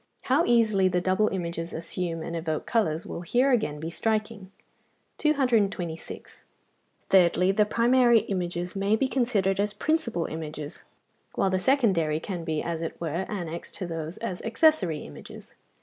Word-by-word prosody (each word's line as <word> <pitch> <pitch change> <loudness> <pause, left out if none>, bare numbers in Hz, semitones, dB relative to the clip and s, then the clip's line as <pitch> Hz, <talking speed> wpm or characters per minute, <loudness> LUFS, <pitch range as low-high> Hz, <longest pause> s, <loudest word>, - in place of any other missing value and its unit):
How 275 +6 +3
easily 220 -5 +3
the 180 -1 +1
double 185 +4 +2
images 170 -3 -4
assume 165 0 -4
and 170 - -5
evoke 160 -2 -3
colours 165 -8 0
will - - -6
here 250 +9 +2
again 215 - 0
be 160 +2 -5
striking. 215 -1 -2 0.7
226. 225 - -1 0.7
Thirdly, 185 0 +4
the 210 +1 +2
primary 240 0 +4
images 180 -3 -3
may 200 +2 +2
be 260 +4 +1
considered 215 -8 +1
as 205 0 0
principal 235 - 0
images, 155 -2 -6 0.5
while 190 - +1
the 185 - +1
secondary 185 - +2
can 175 0 -5
be, 160 -2 -2
as 165 -1 -3
it 165 - -5
were, 170 +3 -3
annexed 170 -5 -5
to 190 - -5
these 165 0 -5
as 180 - -4
accessory 225 - +2
images. 75 - -11
190 Hz, 150 wpm, -27 LUFS, 165-225 Hz, 0.7 s, Thirdly